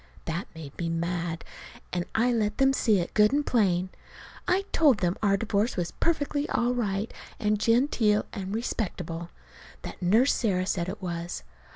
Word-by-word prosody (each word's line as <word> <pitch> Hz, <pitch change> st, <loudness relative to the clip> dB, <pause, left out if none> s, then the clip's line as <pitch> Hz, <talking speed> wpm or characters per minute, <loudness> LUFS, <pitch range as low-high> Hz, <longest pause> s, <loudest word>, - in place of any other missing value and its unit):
That 170 Hz, +3 st, -3 dB
made 150 Hz, -4 st, -9 dB
me 170 Hz, -1 st, -1 dB
mad, 170 Hz, 0 st, -2 dB, 0.5 s
and 175 Hz, -1 st, -1 dB
I 240 Hz, +2 st, +3 dB
let 210 Hz, -2 st, 0 dB
them 270 Hz, 0 st, +4 dB
see 220 Hz, -5 st, +3 dB
it, 175 Hz, -1 st, -2 dB
good 210 Hz, +1 st, +5 dB
and 290 Hz, +1 st, +1 dB
plain. 185 Hz, -5 st, +2 dB, 0.6 s
I 370 Hz, +2 st, +3 dB
told 290 Hz, -8 st, +5 dB
them 175 Hz, -2 st, 0 dB
our 200 Hz, -2 st, +3 dB
divorce 215 Hz, +1 st, 0 dB
was 175 Hz, -1 st, -1 dB
perfectly 295 Hz, -3 st, 0 dB
all 240 Hz, +1 st, +1 dB
right 215 Hz, -3 st, -1 dB, 0.3 s
and 210 Hz, -2 st, +1 dB
genteel 230 Hz, -2 st, +3 dB
and 195 Hz, -3 st, -4 dB
respectable; 175 Hz, -7 st, -3 dB, 0.5 s
that -, -, -8 dB
Nurse 220 Hz, +10 st, +4 dB
Sarah 185 Hz, -6 st, +1 dB
said 180 Hz, -2 st, -1 dB
it 195 Hz, 0 st, -7 dB
was. 170 Hz, -, -4 dB
205 Hz, 165 wpm, -27 LUFS, 175-235 Hz, 0.6 s, good